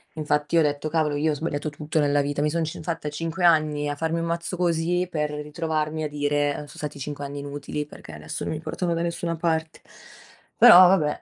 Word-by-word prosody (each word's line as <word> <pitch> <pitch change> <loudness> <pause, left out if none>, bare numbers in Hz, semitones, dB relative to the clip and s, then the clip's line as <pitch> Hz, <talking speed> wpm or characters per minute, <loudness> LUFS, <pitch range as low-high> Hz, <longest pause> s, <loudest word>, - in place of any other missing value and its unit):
infatti 150 +1 0
ho - - +6
detto: 150 0 0
"Cavolo 155 -2 +1
io 155 +2 +1
ho - - 0
sbagliato 150 0 -3
tutto 150 +2 -3
nella 145 0 +2
vita, 145 0 -2
mi 150 - +2
sono 165 +1 -1
cin 155 - -7
fatta 165 -2 -3
5 165 +4 -2
anni 155 -3 +3
a 145 - -2
farmi 160 +2 -1
un 165 - -2
mazzo 170 +2 -3
così, 175 +1 +1
per 150 -3 -2
ritrovarmi 155 +1 -3
a 150 - -2
dire 145 0 -1
so - - -14
stati 150 -1 -6
5 145 +1 -5
anni 140 0 -5
inutili 145 +1 -5
perché 145 - -12
adesso 75 0 -6
non - - -2
mi 155 - -4
portano 170 +2 -2
da 165 - -1
nessuna 170 -1 -2
parte." 160 -1 -2 0.8
Però - - +10
vabbè. 155 -6 +2
155 Hz, 215 wpm, -24 LUFS, 145-165 Hz, 0.8 s, Però